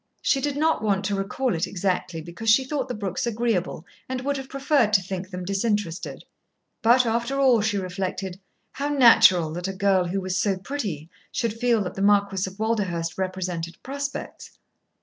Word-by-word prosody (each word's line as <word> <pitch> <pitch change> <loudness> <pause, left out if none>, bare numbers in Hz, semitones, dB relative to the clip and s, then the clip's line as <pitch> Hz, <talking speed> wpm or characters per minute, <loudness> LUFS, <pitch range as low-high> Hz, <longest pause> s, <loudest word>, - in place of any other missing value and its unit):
She 270 - +2
did 290 0 -1
not 315 -5 +2
want 200 -2 0
to 200 +1 0
recall 210 +6 -1
it 170 +2 -1
exactly, 180 -2 -2
because 175 +7 -4
she 230 +5 +6
thought 265 -1 -2
the 250 - -4
Brookes 200 +2 -3
agreeable 220 -8 -1 0.2
and 260 0 -2
would 285 +2 -1
have 270 0 -7
preferred 275 -5 +2
to 195 - +5
think 185 0 -5
them 180 -2 -6
disinterested. 195 -3 -2 0.6
But, 245 +2 +5
after 235 +4 -1
all, 255 -5 +5
she 210 -1 0
reflected, 185 0 -4 0.3
how 280 +2 -3
natural 225 - +6
that 175 +2 -3
a 195 - -3
girl 190 -1 +2
who 185 +3 -2
was 185 -1 -3
so 195 +1 +1
pretty 190 - -4 0.2
should 230 -3 -1
feel 230 -2 +1
that 180 - -5
the 195 - -5
Marquis 200 -2 +2
of 190 - -16
Walderhurst 190 -7 -1
represented 180 -3 -3
prospects. 280 +1 -6
200 Hz, 180 wpm, -24 LUFS, 185-245 Hz, 0.6 s, she